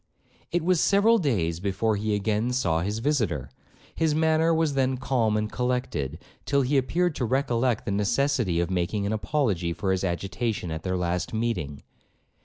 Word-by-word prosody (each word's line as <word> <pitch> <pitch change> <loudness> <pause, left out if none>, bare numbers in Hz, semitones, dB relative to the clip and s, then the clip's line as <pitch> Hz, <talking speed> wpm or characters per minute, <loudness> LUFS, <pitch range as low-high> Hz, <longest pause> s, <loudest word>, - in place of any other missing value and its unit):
It 175 -1 0
was 180 -1 +2
several 220 +3 +4
days 90 - 0
before 105 +3 0
he 105 +1 -1
again 105 +4 0
saw 85 -10 +1
his 105 +4 -2
visitor; 110 - -1 0.4
his 160 -2 +1
manner 160 +1 +3
was 160 -2 +1
then 130 -1 +1
calm 120 -5 +1
and 105 0 -2
collected, 125 - -2 0.3
till 140 -1 +2
he 135 +3 0
appeared 170 +6 +1
to - - -1
recollect 125 -2 0
the - - -2
necessity 105 -2 +1
of 85 +2 -1
making 95 +3 -1
an 100 - -1
apology 105 - 0
for 95 +2 -1
his 95 0 0
agitation 95 +2 -2
at 80 0 -4
their 90 +1 -2
last 90 +3 -2
meeting. 90 -12 -2
110 Hz, 170 wpm, -26 LUFS, 90-140 Hz, 0.4 s, several